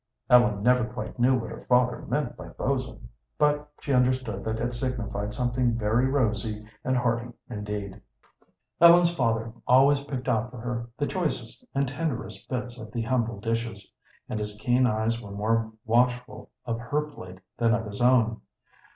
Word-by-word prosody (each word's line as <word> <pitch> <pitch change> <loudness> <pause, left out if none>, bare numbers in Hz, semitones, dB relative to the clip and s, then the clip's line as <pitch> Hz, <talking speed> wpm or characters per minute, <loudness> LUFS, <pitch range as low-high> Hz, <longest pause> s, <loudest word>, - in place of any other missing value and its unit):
Ellen 120 -5 +5
never 125 0 +4
quite 110 +1 -7
knew 130 +2 +4
what 115 -2 -5
her - - -9
father 125 0 +3
meant - - -1
by - - -9
bo'sn, - - -3 0.3
but 150 0 +2
she 140 - -1
understood 125 -5 +1
that 110 0 -2
it 120 +1 -1
signified 120 -5 -3
something 120 +1 0
very 115 +3 +2
rosy 110 -5 0 0.2
and 130 0 +1
hearty 120 0 0 0.2
indeed. 105 -2 -5 0.8
Ellen's 170 0 +8
father 115 -5 0
always 140 +2 +5
picked 130 -3 -5
out 115 -1 +1
for 125 - -11
her 120 0 -4
the 145 - 0
choicest 150 - -3
and 140 0 +2
tenderest 135 -1 -4
bits 125 -2 -4
of 110 - -9
the 115 -2 -2
humble 115 -3 0
dishes, 115 -2 -3 0.3
and 110 - -3
his 105 0 -3
keen 125 +3 +3
eyes 110 +1 0
were 105 - -10
more 110 +2 0
watchful 125 +2 +1 0.2
of 115 -2 -2
her 145 +6 -1
plate 90 -12 -10 0.2
than 115 -1 +4
of 115 -1 -3
his 100 +2 -6
own. 120 -3 +3
120 Hz, 165 wpm, -27 LUFS, 110-125 Hz, 0.8 s, Ellen's